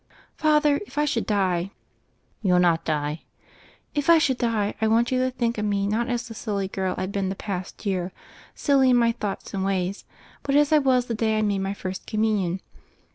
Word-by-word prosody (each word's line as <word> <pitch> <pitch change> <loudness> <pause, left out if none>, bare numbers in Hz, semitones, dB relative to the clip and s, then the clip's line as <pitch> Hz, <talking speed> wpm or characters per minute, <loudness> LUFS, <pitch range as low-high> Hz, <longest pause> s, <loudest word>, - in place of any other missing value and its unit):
"Father, 300 -2 +3
if 275 - -15
I 295 - +3
should 250 -6 -1
die 185 -3 +1 0.4
" - - -42
"You'll 180 -4 +3
not 175 -2 +3
die." 150 0 -1 0.7
"If 290 +1 -1
I 335 - +8
should 270 -5 +1
die, 220 -4 0
I 220 - +3
want 230 +3 +2
you 255 - +2
to 255 0 +2
think 235 -3 -1
of 210 - -1
me 200 -1 0
not 225 +5 0
as 245 0 -2
the 225 - -8
silly 205 -3 -3
girl 190 -1 -2
I've 185 +1 -3
been 195 -2 -1
the 195 - -3
past 190 0 -6
year, 185 -2 -1 0.4
silly 275 -3 +3
in 250 - +5
my 235 -1 +4
thoughts 210 -4 -5
and 195 -1 -1
ways, 190 0 -1 0.4
but 275 - -1
as 295 0 +4
I 305 - +7
was 260 -3 +2
the 235 - -3
day 220 0 +1
I 215 - +1
made 200 -2 +1
my 195 +1 -2
First 185 -1 -6
Communion? 210 -5 0
215 Hz, 215 wpm, -25 LUFS, 190-250 Hz, 0.7 s, I